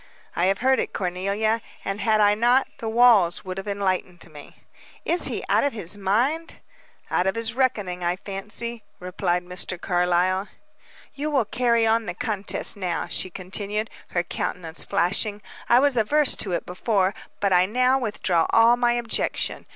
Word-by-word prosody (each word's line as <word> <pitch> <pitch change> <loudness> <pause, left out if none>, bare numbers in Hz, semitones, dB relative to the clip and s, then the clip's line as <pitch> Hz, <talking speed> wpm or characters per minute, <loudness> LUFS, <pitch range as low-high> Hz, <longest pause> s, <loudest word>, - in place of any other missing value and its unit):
"I 175 - +2
have 195 +1 +2
heard 265 0 +4
it, - - -2
Cornelia, 200 +5 -1 0.2
and, 195 +1 -3
had 220 -1 +2
I 205 0 +5
not, 240 +5 +3
the 225 - -3
walls 220 -8 +4
would 185 0 -5
have 195 - -8
enlightened 185 -3 -2
me." 145 -1 -13 0.4
"Is 345 - +1
he - - -3
out - - +3
of 285 - 0
his 205 -4 -2
mind?" 240 +12 -1 0.5
"Out 180 - +1
of 190 - 0
his 230 -1 -1
reckoning, 210 -9 -1
I 175 +1 +1
fancy," 210 +4 -6 0.2
replied 180 0 -1
Mr. 180 0 -3
Carlyle. 180 +2 +1 0.7
"You 295 +2 -3
will 270 -6 +1
carry 235 +1 +1
on 225 0 +2
the 175 - -4
contest 205 -1 -1
now," 185 -4 -2
she 185 - 0
continued, 200 +4 -3 0.2
her 175 - -1
countenance 170 -1 -3
flashing. 200 +2 +1 0.3
"I 235 - +6
was 280 0 +3
averse 280 +6 +2
to 195 - -1
it 170 - -2
before, 190 +1 0 0.3
but 200 -2 +1
I 180 +1 +4
now 255 +4 +2
withdraw 195 -8 0
all 230 +1 +5
my 240 -1 +2
objection. 240 -1 -2
205 Hz, 165 wpm, -24 LUFS, 185-235 Hz, 0.7 s, I